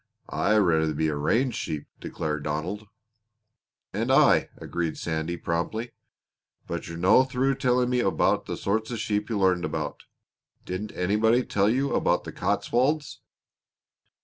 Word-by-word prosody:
"I'd 105 +1 +2
rather 80 -6 +2
be 80 +1 +1
a 75 - -2
range 115 - +1
sheep!" 75 -2 -4
declared 75 -1 -3
Donald. 85 +9 -3 1.1
"And - - -1
I!" - - +5
agreed 85 -2 -3
Sandy 80 +1 -3
promptly. 100 +9 -2 0.7
"But 85 - -5
you're 85 0 -6
no 95 +9 +5
through 130 +1 0
telling 125 -1 +2
me 125 - +2
about 95 -5 +1
the - - -4
sorts 110 +3 -1
of 120 - -3
sheep 105 0 -1
you 110 - -1
learned 95 -2 +2
about. - - -4 0.6
Didn't 95 +4 -4
anybody 110 +6 +2
tell 100 +1 +2
you 135 +4 +1
about - - +2
the - - -7
Cotswolds?" 130 +1 0
105 Hz, 145 wpm, -26 LUFS, 85-120 Hz, 1.1 s, I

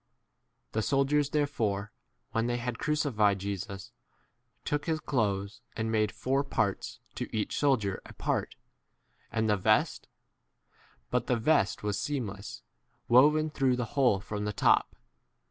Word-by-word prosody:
The 110 - 0
soldiers 140 +3 +2
therefore, 110 -9 -1 0.4
when 115 +1 0
they 120 0 0
had 120 -1 -4
crucified 115 -10 +2
Jesus, 100 0 -5 0.7
took 145 +2 -1
his 160 -1 +1
clothes, 100 -8 -1
and 110 0 -2
made 110 -1 +2
four 135 +2 0
parts, 110 -7 -1
to - - -5
each 110 -2 -2
sol 140 -2 +4
dier 100 -3 -3
a - - -12
part, - - -2 0.8
and 110 0 0
the 105 -1 +3
vest; 95 - +2 1.0
but - - 0
the 125 - +2
vest 115 -5 +2
was 105 -1 -1
seamless, 105 -9 -4 0.5
woven 150 +5 +5
through 135 -4 +2
24 - - -6
the 120 -3 -4
whole 130 -8 +3
from 105 +1 -4
the 105 - -2
top. - - +3
115 Hz, 145 wpm, -30 LUFS, 105-140 Hz, 1.0 s, woven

